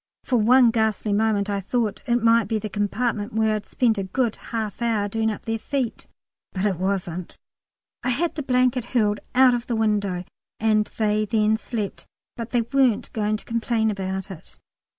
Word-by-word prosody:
(For 250 - +1
one 240 +2 +5
ghastly 220 -2 0
moment 205 -1 +1
I 200 -1 -1
thought 215 +2 -1
it 240 -1 +1
might 230 -2 +4
be 220 - 0
the 215 0 -4
compartment 210 +1 -1
where 220 0 +2
I'd 210 -1 -4
spent 225 -4 +1
a - - -1
good 225 +4 -1
half 220 -1 -3
hour 220 -3 +1
doing 220 +2 0
up 210 - -5
their 225 -1 -2
feet, 260 -1 -3 0.5
but 190 +1 -1
it 195 -4 +1
wasn't.) 185 -2 -3 0.6
I - - -1
had 325 +7 0
the 305 - -4
blanket 250 -2 +2
hurled 210 -2 +2 0.2
out 255 -1 +6
of 240 0 -2
the 235 - -1
window, 205 -5 0 0.4
and 215 -1 +3
they 215 -1 +1
then 215 +1 +2
slept. 220 -2 -5 0.3
But 230 0 -5
they 240 - +2
weren't 255 -1 +1
going 215 -1 0
to - - -12
complain 230 -1 0
about 190 -1 -4
it. 175 - -12
220 Hz, 185 wpm, -24 LUFS, 205-235 Hz, 0.6 s, out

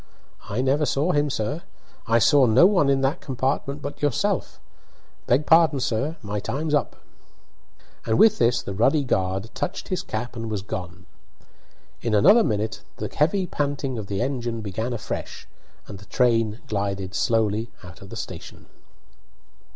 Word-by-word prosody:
"I 105 +5 -1
never 140 +3 +2
saw 150 +6 +1
him, 145 -2 +1
sir; 135 +6 -2 0.5
I 115 0 +4
saw 135 +2 +5
no 120 +9 +6
one 180 -8 +4
in 135 -1 +2
that 135 +6 0
compartment 140 +2 -2
but 145 - -6
yourself. 145 -5 -1 0.7
Beg 135 +5 +2
pardon, 160 -3 +5
sir; 135 +7 -1
my 105 0 -3
time's 150 +9 -3
up." 145 - +1 1.1
And 110 - +2
with 220 -1 +5
this 120 +1 +2
the 100 - -5
ruddy 135 +9 +3
guard 95 -3 -1
touched 180 - -4
his 185 - -1
cap 120 +3 -5
and 115 -1 -5
was 105 -3 -3
gone. 90 -2 -7 1.0
In 115 -3 0
another 205 - +6
minute 110 0 -2
the - - -5
heavy 175 +6 +2
panting 140 -6 -2
of 105 - -6
the 100 +2 -1
engine 120 -4 -3
began 110 +4 -3
afresh, 120 -3 -5 0.4
and 100 - -9
the 100 - -14
train 115 -3 +1
glided 100 -2 -3
slowly 110 +1 +1
out 90 -2 -12
of 100 - -11
the - - -8
station. - - -8
120 Hz, 160 wpm, -24 LUFS, 105-145 Hz, 1.1 s, no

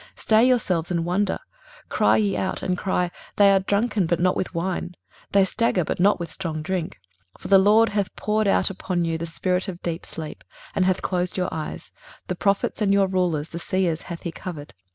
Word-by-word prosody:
23:029:009 - - -21
Stay 220 +2 +4
yourselves, 185 -10 +1
and 170 -2 -1
wonder; 190 +4 0 0.5
cry - - +3
ye 205 -3 +1
out, 190 - -2
and 185 - 0
cry: 180 -1 -1 0.2
they 200 -1 +6
are 195 - +5
drunken, 205 0 0
but 170 0 +1
not 180 +1 +2
with - - -2
wine; 180 0 -3 0.4
they 200 -1 +5
stagger, 190 -2 +1
but - - -3
not 200 +2 +4
with 170 - -5
strong 160 -5 -4
drink. 185 -1 -3 0.4
23:029:010 - - -28
For - - -6
the 195 -1 +7
LORD 215 +4 +5
hath 205 -2 -2
poured 215 0 0
out 195 - +3
upon 185 -2 -2
you 165 -1 -1
the 170 - -4
spirit 180 +3 -1
of 180 -2 -6
deep 170 0 -3
sleep, 155 -2 -7 0.3
and 185 - +2
hath 185 0 +1
closed 180 0 -1
your 180 -1 0
eyes: 155 -1 -6 0.3
the 180 - -3
prophets 200 +4 0
and 200 -2 +3
your 200 0 +4
rulers, 180 -5 0
the 170 - -6
seers 175 -2 0
hath 170 -1 -6
he 170 - -3
covered. 160 -4 -8
185 Hz, 215 wpm, -24 LUFS, 170-200 Hz, 0.5 s, the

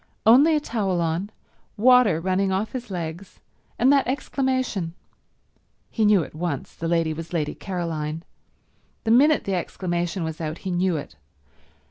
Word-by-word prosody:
Only 275 +8 +6
a - - +3
towel 205 -10 -1
on, 170 +4 -1 0.5
water 240 -6 +5
running 190 +2 0
off 195 +3 -1
his 245 -3 -6
legs, 175 0 -6 0.4
and 260 +4 +4
that 275 -2 +3
exclamation. 260 - -1 1.0
He 220 - +1
knew 205 -4 +5
at - - -11
once 170 +2 -4
the 165 - -5
lady 165 -1 +1
was 165 +2 -8
Lady 155 -3 -1
Caroline—the 165 +4 -6
minute 290 +6 +5
the 195 - -2
exclamation 175 0 -2
was 160 0 -5
out 155 0 -3
he 190 - -1
knew 175 -1 +1
it. 90 - -8
185 Hz, 145 wpm, -24 LUFS, 165-230 Hz, 1.0 s, Only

